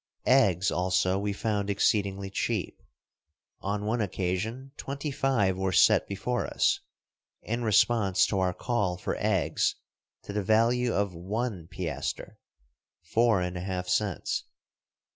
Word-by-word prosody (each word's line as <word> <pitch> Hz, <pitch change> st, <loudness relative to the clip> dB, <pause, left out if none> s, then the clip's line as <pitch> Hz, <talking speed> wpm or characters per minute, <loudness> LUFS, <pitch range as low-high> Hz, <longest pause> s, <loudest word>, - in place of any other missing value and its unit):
Eggs, 100 Hz, -8 st, +4 dB
also, 95 Hz, +1 st, +1 dB
we 100 Hz, 0 st, -1 dB
found 105 Hz, -1 st, -1 dB
exceedingly 100 Hz, -1 st, +1 dB
cheap. -, -, -2 dB, 0.8 s
On 105 Hz, +1 st, -3 dB
one 115 Hz, +2 st, 0 dB
occasion, 105 Hz, +7 st, -3 dB
twenty 140 Hz, +2 st, -4 dB
five 120 Hz, -9 st, +1 dB
were 95 Hz, 0 st, -1 dB
set 95 Hz, +3 st, +5 dB
before 105 Hz, +5 st, -2 dB
us, -, -, +2 dB, 0.6 s
in 115 Hz, +2 st, -2 dB
response 105 Hz, -3 st, +3 dB
to 100 Hz, -, -1 dB
our 95 Hz, -1 st, +2 dB
call 100 Hz, -8 st, -1 dB
for -, -, -3 dB
eggs -, -, +1 dB, 0.5 s
to 100 Hz, -, -7 dB
the 105 Hz, -, 0 dB
value 115 Hz, +4 st, +2 dB
of 100 Hz, -3 st, 0 dB
one 95 Hz, +1 st, -3 dB
piaster -, -, -4 dB, 0.3 s
— -, -, -59 dB
four 115 Hz, -4 st, +4 dB
and 90 Hz, 0 st, -3 dB
a 90 Hz, -, -4 dB
half 90 Hz, -1 st, -3 dB
cents. 100 Hz, 0 st, -1 dB
100 Hz, 135 wpm, -28 LUFS, 95-115 Hz, 0.8 s, set